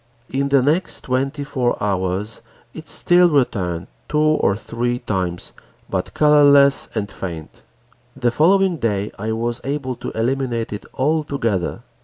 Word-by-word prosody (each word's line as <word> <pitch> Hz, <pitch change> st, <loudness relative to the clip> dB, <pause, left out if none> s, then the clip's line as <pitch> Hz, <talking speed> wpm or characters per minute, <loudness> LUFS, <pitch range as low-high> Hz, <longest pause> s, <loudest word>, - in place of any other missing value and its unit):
In 140 Hz, +1 st, 0 dB
the 140 Hz, -2 st, +4 dB
next 160 Hz, +7 st, +2 dB
twenty 135 Hz, +3 st, -1 dB
four 130 Hz, -4 st, -1 dB
hours, 100 Hz, +1 st, -2 dB, 0.3 s
it -, -, -10 dB
still 175 Hz, 0 st, +4 dB
returned 95 Hz, -, 0 dB, 0.2 s
two 150 Hz, -, -1 dB
or 155 Hz, -9 st, +3 dB
three 120 Hz, +3 st, -2 dB
times, 95 Hz, -7 st, -3 dB, 0.4 s
but 95 Hz, -1 st, -3 dB
colorless 145 Hz, -2 st, +5 dB
and 100 Hz, -1 st, -2 dB
faint. 85 Hz, -5 st, -7 dB, 0.5 s
The 125 Hz, -3 st, 0 dB
following 180 Hz, +6 st, +3 dB
day 105 Hz, -5 st, -1 dB
I 110 Hz, +2 st, -2 dB
was 115 Hz, +2 st, -2 dB
able 135 Hz, -2 st, -3 dB
to -, -, -5 dB
eliminate 120 Hz, -1 st, -1 dB
it 105 Hz, -, -7 dB
altogether. 140 Hz, -, -1 dB
125 Hz, 135 wpm, -20 LUFS, 105-145 Hz, 0.5 s, colorless